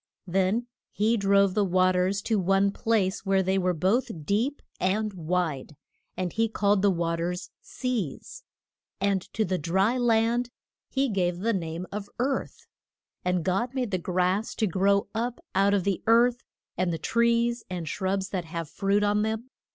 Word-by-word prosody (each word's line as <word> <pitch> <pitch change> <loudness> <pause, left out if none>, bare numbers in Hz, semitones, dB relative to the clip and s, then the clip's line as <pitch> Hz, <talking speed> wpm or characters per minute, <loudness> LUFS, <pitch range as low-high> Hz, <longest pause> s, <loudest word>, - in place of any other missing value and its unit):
Then 190 +5 +1 0.2
he 220 +3 +1
drove 200 -2 +3
the 210 - +2
wa 185 -1 +3
ters 185 +2 0
to 220 -3 +1
one 195 +2 +3
place 205 -3 0
where 195 -1 +2
they 190 +1 +1
were 180 -1 +1
both 190 - 0
deep 235 - 0 0.2
and 210 +3 0
wide, 165 -4 -2 0.4
and 180 -2 -2
he 225 0 +1
called 205 -2 +2
the 200 - +4
wa 170 -2 0
ters 180 +2 -3
Seas, 245 - -4 0.6
and 200 -1 +1
to 220 - +1
the 185 0 -1
dry 190 - +1
land 235 +1 +2 0.4
he 275 0 +1
gave 180 -6 0
the 230 +2 +1
name 170 -2 -3
of 205 0 -5
Earth. 265 +3 -2 0.6
And 180 -2 0
God 235 +8 0
made 250 -5 -1
the 185 - 0
grass 185 +4 0
to 220 - +1
grow 200 +2 +2
up 235 +2 -2
out 200 +1 +3
of 195 - +1
the 195 -1 -1
earth, 240 +2 +4 0.3
and 180 -1 0
the 165 - -2
trees 235 +4 +1
and 175 -3 -4
shrubs 190 +3 -1
that 185 -4 -3
have 165 -1 -5
fruit 200 +1 +1
on 205 0 +2
them. 220 +3 -2
195 Hz, 170 wpm, -27 LUFS, 180-225 Hz, 0.6 s, the